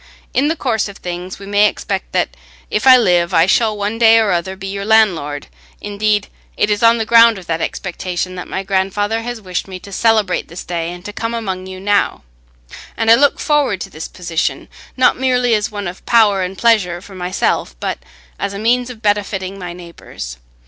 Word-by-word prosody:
In 275 +3 +2
the 320 - 0
course 230 -9 -1
of 200 0 -10
things 180 +1 -6
we 200 - -11
may 205 +1 +4
expect - - -5
that, - - -1 0.4
if 210 +5 0
I 260 -1 +10
live, 175 -7 +2
I 165 - +6
shall 215 +2 +2
one 205 +2 -3
day 225 -1 +7
or 220 -3 +3
other 180 +2 -1
be 190 0 -9
your 200 +1 -4
landlord; 185 -10 +2 0.3
indeed, 205 0 0 0.3
it 210 - +1
is 205 +2 0
on 230 0 +5
the 225 - -1
ground 230 -1 +6
of 185 - -10
that 165 -1 -2
expectation 185 0 -3
that 180 -1 -7
my 190 - -4
grandfather 200 +3 0
has 240 0 -5
wished 185 -3 -4
me 190 -1 -7
to 200 - -12
celebrate 215 -2 +1
this 170 - -8
day 170 -1 -3
and 175 +1 -10
to 205 - -6
come 230 +2 -3
among 190 -5 -4
you 185 0 -8
now; 205 +1 0 0.7
and 225 -1 +3
I - - +11
look 285 +4 +3
forward 290 - +1
to - - -6
this 155 - -7
position, 170 -2 -3 0.3
not 255 - +3
merely 250 -2 +2
as 210 -1 +1
one 205 -2 -5
of 180 +2 -8
power 215 -4 +4
and 185 +1 -4
pleasure 205 -7 +2
for 195 +2 -14
myself, 180 - -1
but - - -3 0.4
as 200 - -3
a - - -4
means 245 +4 +1
of 230 -3 -11
benefiting 195 -2 -1
my 180 -1 -6
neighbours. 170 - -9
200 Hz, 205 wpm, -17 LUFS, 185-225 Hz, 0.7 s, I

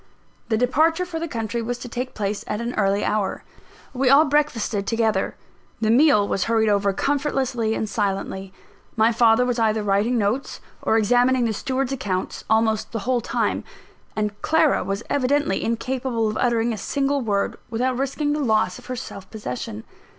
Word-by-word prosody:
The 220 - +2
departure 315 +9 +2
for 340 -2 -5
the 335 - -3
country 230 -3 -3
was 240 +2 -3
to 245 - -8
take 250 +2 -5
place 205 -1 -2
at 210 - -2
an 235 +1 -3
early 200 -1 +1
hour. 210 -2 -1 0.5
We 260 0 +2
all 285 +4 +7
breakfasted 250 -9 0
together; 225 -4 0 0.4
the 220 0 +2
meal 245 -5 +5
was 195 - 0
hurried 225 -1 +2
over 200 -1 +2
comfortlessly 265 -2 0
and 220 - -2
silently. 195 -2 -2 0.4
My 225 0 +4
father 230 +1 +4
was 245 -1 -1
either 220 -1 +1
writing 205 +5 +1
notes, 225 +6 -1 0.2
or 220 - +2
examining 245 +3 +3
the 225 - 0
steward's 260 +4 -2
accounts, 200 -8 -3
almost 220 0 +1
the 225 - -1
whole 250 -1 +1
time; - - -1 0.5
and 210 -1 -2
Clara 320 -2 +3
was 195 +3 -3
evidently 285 +2 +1
incapable 235 0 -1
of 215 - -3
uttering 235 -1 +1
a 215 - -5
single 280 0 0
word, 205 -4 -1
without 250 +3 0
risking 275 +3 -1
the 300 - -1
loss 215 -8 +1
of - - -15
her 255 - -3
self 195 -5 -8
possession. 125 - -6
230 Hz, 170 wpm, -23 LUFS, 215-260 Hz, 0.5 s, all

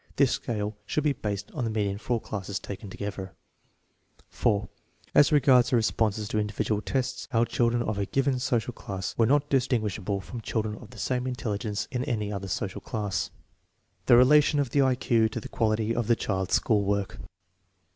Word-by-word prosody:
This 140 -3 +4
scale 105 -2 -2
should 150 - 0
be 150 -2 +2
based 105 -4 -4
on - - -3
the 115 - 0
median 100 -2 -1
for 120 - -2
all 115 - +1
classes 100 -3 -4
taken 100 +1 -7
together. 95 -1 -6 0.9
4. 105 +1 0 0.5
As 145 - +6
regards 130 -4 +5
their 125 - +3
responses 110 -1 0
to 110 - 0
individual 105 0 -1
tests, 130 +2 -2
our 115 0 +3
children 120 0 +1
of 105 -3 -2
a 100 - -1
given 135 -1 +1
social 125 -2 0
class 95 -4 -5
were 115 - +3
not 145 +2 +3
distinguishable 110 -7 0
from 115 +5 -8
children 110 -1 -2
of 115 - -12
the - - -14
same 125 0 -1
intelligence 105 -4 -3
in 125 -1 -1
any 105 -7 -2
other 100 -1 -4
social 95 +1 -3
class. 105 -3 -2 0.8
The 120 - +8
relation 145 +4 +5
of 135 -5 0
the 140 - +3
I 130 -1 +3
Q 115 -3 +2
to 115 - -4
the - - -8
quality 110 0 0
of 120 -2 -1
the 115 - +4
child's 95 -4 -1
school 105 -4 +2
work. 100 0 -1
110 Hz, 185 wpm, -27 LUFS, 105-125 Hz, 0.9 s, The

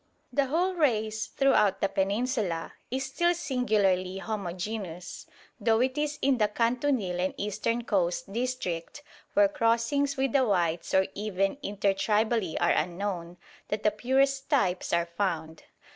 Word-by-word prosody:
The 280 -1 +2
whole 350 +7 +1
race 220 -9 0
throughout 270 -8 +3
the - - +2
Peninsula 200 - -1 0.2
is 265 +2 -2
still 345 +6 +1
singularly 210 - +1
homogeneous, 190 -2 -5 0.3
though 225 -1 +3
it 255 +1 +1
is 295 0 -1
in 270 -2 +3
the 210 - +4
Kantunil 230 -4 0
and 185 +1 -1
eastern 230 +3 -1
coast 190 -3 -1
district, 245 - -3 0.3
where 305 0 +6
crossings 280 +1 +1
with 265 -1 +1
the 270 +1 +4
whites 175 -7 0
or 190 0 +5
even 200 +3 -1
inter 200 -3 0
tribally 210 -2 +1
are - - +3
unknown, 175 0 -2 0.3
that 210 0 -3
the 210 - +4
purest 270 +4 +1
types 190 - +1
are 170 0 +2
found. 170 -3 -3
215 Hz, 140 wpm, -28 LUFS, 185-265 Hz, 0.3 s, where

